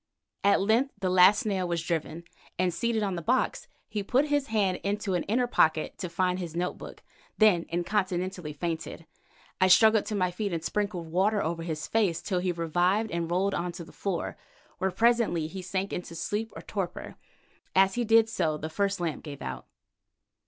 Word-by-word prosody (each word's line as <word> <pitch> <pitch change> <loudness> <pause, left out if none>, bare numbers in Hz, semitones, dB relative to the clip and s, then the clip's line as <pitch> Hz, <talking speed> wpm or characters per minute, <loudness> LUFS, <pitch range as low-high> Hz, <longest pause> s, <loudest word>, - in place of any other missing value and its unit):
At 200 0 +5
length 230 +7 +2
the 185 -2 0
last 185 +4 +6
nail 190 -4 0
was 170 -1 -1
driven, 165 0 -3 0.3
and 180 -1 +1
seated 225 +3 0
on 195 -2 -1
the 170 - -3
box 250 +10 0 0.2
he 210 -1 -3
put 260 +9 +1
his 290 -1 +1
hand 200 -5 +1
into 200 -1 -1
an 175 - +1
inner 245 +5 +1
pocket 160 -10 +1
to 180 - -4
find 180 +1 0
his 170 -3 -6
note 180 +1 -2
book, - - -10 0.3
then 205 -6 +4
incontinently 180 -1 -1
fainted. 165 +1 -4 0.6
I 185 - +6
struggled 220 +3 +5
to 215 - -2
my 185 -2 +1
feet 200 +1 -3
and 165 -1 -3
sprinkled 200 -6 -2
water 200 +4 +2
over 165 +1 -2
his 160 -2 -4
face 200 -7 +1
till 180 +2 -1
he 180 0 0
revived 175 +6 +1
and 170 -1 -2
rolled 190 +3 +1
on 175 +1 -2
to 170 0 -7
the 165 - -14
floor, 190 -4 -3 0.4
where 190 - +1
presently 225 -6 +2
he 185 +4 -6
sank 190 +2 -3
into 175 -1 -5
sleep 210 +6 -3
or - - -8
torpor. 185 -4 -5 0.6
As 190 0 +5
he 240 - 0
did 225 0 +5
so 165 -8 -1
the 155 +1 -5
first 200 +2 0
lamp 170 -3 -3
gave 145 -3 -8
out. 65 -1 -6
185 Hz, 190 wpm, -28 LUFS, 170-210 Hz, 0.6 s, last